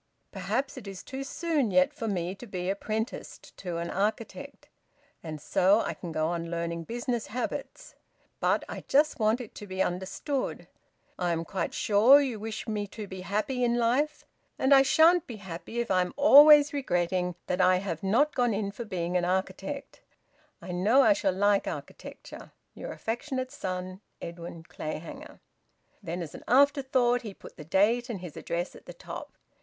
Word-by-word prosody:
Perhaps 225 +9 -2
it 225 -6 -9
is 195 -2 -8
too 270 +1 -6
soon 295 -3 0
yet 185 -1 +3
for 225 - -5
me 180 -3 -2
to 220 +5 -11
be 185 -2 -2
apprenticed 215 +3 -5
to 175 -3 -4
an 170 0 -3
architect, 220 +7 -3 0.5
and 155 -2 -6
so 195 +8 +3
I - - -2
can 175 - -8
go 155 0 0
on 170 -1 -3
learning 170 0 -3
business 240 +1 -3
habits. 245 +3 -5 0.5
But - - +2
I - - -7
just 295 +1 +3
want 220 +2 +2
it 230 - -10
to 205 - -9
be 190 0 -6
understood. 195 - -3 0.5
I 175 -1 +1
am 165 0 -1
quite 190 - -3
sure 220 +7 +6
you 260 -6 -2
wish 220 +1 -5
me 210 -2 -2
to 210 +2 -7
be 190 -1 -8
happy 215 +7 -1
in 240 0 +2
life, 265 +6 +1 0.3
and 265 +2 +4
I 270 - +8
shan't 320 +5 +5
be 235 - -6
happy 195 +3 -7
if 235 -3 -1
I 185 -1 +4
am 180 - -3
always 295 0 +8
regretting 180 -8 0
that 180 +1 0
I 185 0 +5
have 180 -4 -4
not 240 +11 +2
gone 245 -4 +1
in 200 -1 -2
for 230 +4 -7
being 180 -3 -3
an 175 - 0
architect. 190 +9 -3 0.6
I - - -6
know 210 +10 +4
I 210 - +6
shall 195 -1 0
like 200 +2 +2
architecture. - - -8 0.2
Your - - -7
affectionate 255 +3 -3
son, 185 -6 -5 0.2
Edwin 170 -1 -8
Clayhanger." 155 0 -7 0.6
Then, 175 -2 -4
as 155 - -9
an - - -10
afterthought, 260 -2 +3
he 210 -4 -8
put - - -13
the 150 - -9
date 220 - +2
and 220 -5 -4
his 175 -4 -9
address 175 +2 -3
at - - -15
the - - -8
top. - - -9
205 Hz, 180 wpm, -28 LUFS, 180-250 Hz, 0.6 s, I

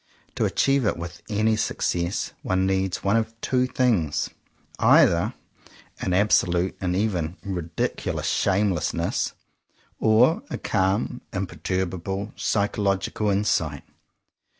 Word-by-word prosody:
To - - 0
achieve 140 -1 +2
it - - 0
with 85 0 -7
any 110 +1 +2
success 85 -4 -1
one 95 0 +1
needs 95 -1 0
one 100 +2 +2
of 115 0 -3
two 125 +2 +1
things; 110 - +1 0.5
either - - +4 0.6
an 90 - -1
absolute 90 -2 +2
and 90 -1 0
even 90 -4 -1
ridiculous 90 -4 -3
shameless 95 -4 +1
ness, - - -1 0.7
or 115 +8 +4
a - - -3
calm, 100 +6 0
imperturbable, 95 +2 -3
psychological 100 0 0
insight. 85 -8 0
95 Hz, 105 wpm, -24 LUFS, 90-110 Hz, 0.7 s, either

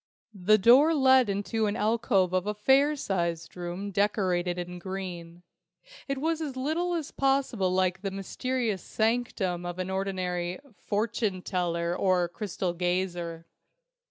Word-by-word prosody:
The 205 +2 +4
door 260 +10 +6
led 260 -4 +5
into 210 +2 -1
an 205 - -1
alcove 210 -5 +1
of 185 +1 0
a 210 - -1
fair 270 +7 +4
sized 170 - -2
room 180 +3 -5
decorated 185 -3 +1
in 180 0 -5
green. 175 -2 -7 0.6
It 275 -1 -2
was 320 +3 -1
as 285 -4 -4
little 320 +7 -1
as 320 -4 -4
possible 270 -8 +1
like 185 0 +1
the 200 - -2
mysterious 215 +2 -2
sanctum 220 -6 -1
of 175 0 -5
an 185 0 -3
ordinary 185 -2 -2 0.2
"fortune 210 -3 -2
teller" 170 -1 -1
or 185 -2 +2
crystal 185 -1 -3
gazer. 175 -2 -2
195 Hz, 135 wpm, -28 LUFS, 180-235 Hz, 0.6 s, door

